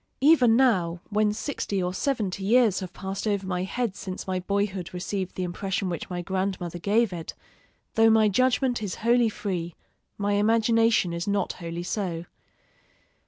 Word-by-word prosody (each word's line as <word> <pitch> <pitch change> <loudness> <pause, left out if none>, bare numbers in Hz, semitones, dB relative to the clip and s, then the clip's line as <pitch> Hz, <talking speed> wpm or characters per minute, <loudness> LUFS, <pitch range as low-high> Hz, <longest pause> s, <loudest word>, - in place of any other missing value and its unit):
Even 265 -6 +6
now, 185 -10 +2
when 210 0 +2
sixty 210 -3 -3
or 180 0 -2
seventy 200 -6 -1
years 225 -1 +4
have 185 -2 -6
passed 195 +3 -5
over 200 -2 0
my 180 -1 -2
head 210 +2 -2
since 185 -2 -6
my 185 -1 -1
boyhood 195 -1 -2
received 185 +1 -3
the 185 - -2
impression 185 +1 -2
which 170 - -5
my 175 -1 -4
grandmother 185 -2 -2
gave 210 +2 +2
it, 165 -2 -6 0.6
though 225 0 +5
my 220 -1 +5
judgment 250 +3 +2
is 205 -3 -3
wholly 240 -1 +4
free, 175 -6 -4 0.4
my 205 0 0
imagination 225 -2 +3
is 170 +2 -4
not 200 0 0
wholly 170 0 -6
so. 175 -3 -3
200 Hz, 160 wpm, -26 LUFS, 180-225 Hz, 0.6 s, Even